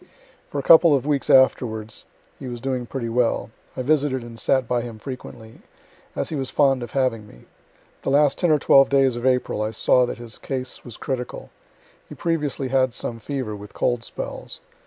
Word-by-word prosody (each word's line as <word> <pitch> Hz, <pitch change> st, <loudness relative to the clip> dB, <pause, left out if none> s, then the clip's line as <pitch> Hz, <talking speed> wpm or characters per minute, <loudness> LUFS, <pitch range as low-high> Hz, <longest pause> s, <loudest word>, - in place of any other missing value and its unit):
For -, -, -5 dB
a 140 Hz, -, -1 dB
couple 165 Hz, -1 st, +7 dB
of 135 Hz, -1 st, -1 dB
weeks 145 Hz, -2 st, 0 dB
afterwards 110 Hz, -4 st, +2 dB, 0.3 s
he 135 Hz, -, -7 dB
was 120 Hz, -1 st, -6 dB
doing 130 Hz, -1 st, -3 dB
pretty 125 Hz, -2 st, -4 dB
well. 115 Hz, -1 st, 0 dB, 0.3 s
I 130 Hz, -, -2 dB
visited 140 Hz, -2 st, +1 dB
and 115 Hz, -1 st, -10 dB
sat 130 Hz, 0 st, +1 dB
by 120 Hz, 0 st, 0 dB
him 115 Hz, -2 st, -7 dB
frequently, 120 Hz, -2 st, -9 dB, 0.6 s
as -, -, -2 dB
he 160 Hz, -, -3 dB
was 135 Hz, -2 st, -3 dB
fond 135 Hz, -3 st, +2 dB
of 120 Hz, -, -6 dB
having 125 Hz, -6 st, 0 dB
me. -, -, -17 dB, 0.6 s
The -, -, -2 dB
last 145 Hz, 0 st, +3 dB
ten 175 Hz, -, +2 dB
or 155 Hz, -, +5 dB
twelve 135 Hz, -1 st, +5 dB
days 135 Hz, -3 st, +3 dB
of 120 Hz, +2 st, -1 dB
April 125 Hz, -4 st, +1 dB
I 110 Hz, -, 0 dB
saw 125 Hz, +3 st, +3 dB
that -, -, -5 dB
his 115 Hz, -2 st, -8 dB
case 130 Hz, -2 st, -5 dB
was 120 Hz, -4 st, -10 dB
critical. 125 Hz, -2 st, -5 dB, 0.6 s
He -, -, -9 dB
previously 150 Hz, -5 st, -2 dB
had 130 Hz, -2 st, +1 dB
some 115 Hz, -1 st, -4 dB
fever, 125 Hz, -2 st, -4 dB
with 105 Hz, 0 st, -12 dB
cold 120 Hz, -1 st, 0 dB
spells. -, -, -7 dB
130 Hz, 195 wpm, -23 LUFS, 120-140 Hz, 0.6 s, couple